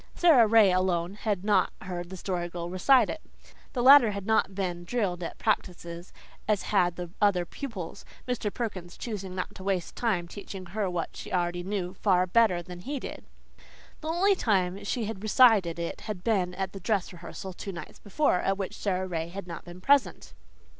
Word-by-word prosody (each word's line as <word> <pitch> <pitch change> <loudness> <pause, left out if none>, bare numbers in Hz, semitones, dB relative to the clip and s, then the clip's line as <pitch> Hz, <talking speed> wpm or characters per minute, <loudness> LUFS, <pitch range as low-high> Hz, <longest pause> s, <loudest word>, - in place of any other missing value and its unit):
Sara 295 -10 +6
Ray 215 -3 +6
alone 180 -1 +1
had 205 -2 -2
not 205 -3 +3
heard 175 -2 -5
the 190 - -7
Story 175 -1 -3
Girl 175 0 -5
recite 245 +8 +5
it. 315 - -5 0.5
The 245 -3 -1
latter 265 -3 +9
had 200 -1 -5
not 220 -3 +2
been 180 -3 -3
drilled 180 -3 -1
at 170 - -5
practices 175 -4 -2 0.4
as 210 -2 +1
had 175 -4 +3
the 175 -1 -6
other 195 -4 +3
pupils, 195 - -7 0.2
Mr. 230 -4 -1
Perkins 190 -7 -5
choosing 195 -5 -5
not 180 - -4
to 190 - -11
waste 190 -3 -2
time 190 -8 0
teaching 195 0 -8
her 195 +2 -2
what 175 -2 -3
she - - -8
already 175 -1 0
knew 185 -1 -3
far 185 -2 +2
better 185 -3 +3
than 180 +1 -9
he 275 +9 -4
did. - - -8 0.7
The 310 - -7
only 360 +5 +3
time 195 - 0
she 230 +2 -1
had 205 -2 -5
recited 215 -6 +5
it 170 0 -4
had 205 -5 -6
been 185 -6 +1
at 190 -1 -3
the 195 - -7
"dress 195 0 -1
rehearsal" 180 +2 -8
two 195 - -6
nights 170 -4 -9
before, 210 -2 +1
at 195 +1 0
which 195 0 -4
Sara 190 -3 -1
Ray 165 -3 -3
had 195 +3 -7
not 170 -2 -8
been 175 +1 -11
present. 280 +5 +2
190 Hz, 190 wpm, -28 LUFS, 175-215 Hz, 0.7 s, latter